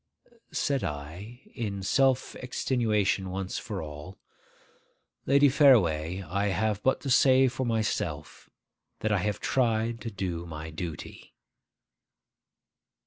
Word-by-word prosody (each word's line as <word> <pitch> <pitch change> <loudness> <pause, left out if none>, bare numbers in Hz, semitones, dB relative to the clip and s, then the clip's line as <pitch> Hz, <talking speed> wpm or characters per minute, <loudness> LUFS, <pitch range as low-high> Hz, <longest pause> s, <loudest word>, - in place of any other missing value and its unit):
Said 140 -3 0
I, 85 - -6
in 100 -4 -4
self 130 +5 +2
extenuation 110 -7 0
once 95 0 -4
for 105 -7 -5
all, 75 +5 -9 1.1
'Lady 140 +1 +6
Fareway, 95 - +4
I 100 +4 -1
have 105 +2 0
but 130 - +1
to 135 - -3
say 130 0 +5
for 130 0 -2
myself 105 -9 -2 0.5
that 110 - 0
I 100 - +2
have 105 +1 -2
tried 115 -2 0
to 115 - -4
do 90 -5 -4
my 80 0 -7
duty. 80 -1 -8
105 Hz, 115 wpm, -28 LUFS, 90-125 Hz, 1.1 s, Lady